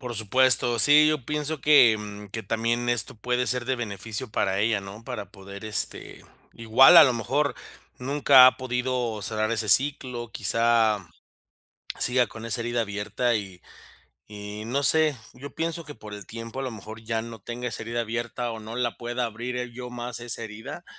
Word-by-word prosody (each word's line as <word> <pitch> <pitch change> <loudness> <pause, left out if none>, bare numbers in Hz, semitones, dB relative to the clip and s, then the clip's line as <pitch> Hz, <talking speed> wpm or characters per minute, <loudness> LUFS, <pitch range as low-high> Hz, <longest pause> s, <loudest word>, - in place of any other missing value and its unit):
Por 125 -2 -6
supuesto. 120 +2 +3
Sí, 150 +5 +6
yo 150 -6 -1
pienso 150 0 -3
que, 125 -7 +6
mm, 105 -1 -9
que 110 +3 -6
también 115 +3 -1
esto 120 -1 0
puede 125 +3 -2
ser, 125 -1 0
de 130 +1 -1
beneficio 110 +1 -4
para 95 -2 0
ella, 110 -1 +1
¿no? 100 +3 -10
Para 100 -4 -7
poder, 100 +1 -11
este, 110 -1 -2 0.3
igual 115 +8 +6
a 165 - +11
lo 130 - +2
mejor, 140 +6 -1 0.4
nunca 135 0 +6
ha 130 - +4
podido 125 -3 -2
cerrar 110 +1 -1
ese 110 -2 -1
ciclo. 125 -1 +2
Quizá, 110 -2 +1 0.9
siga 125 0 +2
con 110 +1 -11
esa 115 +1 -1
herida 120 0 -1
abierta, 105 +3 -2
y 95 -4 -5 0.7
y 105 +1 -7
no 135 +5 -2
sé. 155 -3 +3 0.2
Yo 135 +2 -10
pienso, 165 0 -3
que 145 -3 -10
por 105 -1 -10
el 105 -2 -9
tiempo, 115 +4 -8
a - - -3
lo 130 - -4
mejor, 110 0 -10
ya 115 0 -2
no 115 -1 -9
tenga 120 +4 -6
esa 115 -2 -5
herida 115 +1 -3
abierta, 120 +1 -4
o 110 - -8
no 110 +2 -8
la 120 -2 -2
pueda 120 +1 -3
abrir 120 +2 -5
el 125 -1 -5
yo 125 0 -8
más, 120 -1 -6
esa 120 -1 -5
herida, 110 0 -9
120 Hz, 185 wpm, -25 LUFS, 110-125 Hz, 0.9 s, a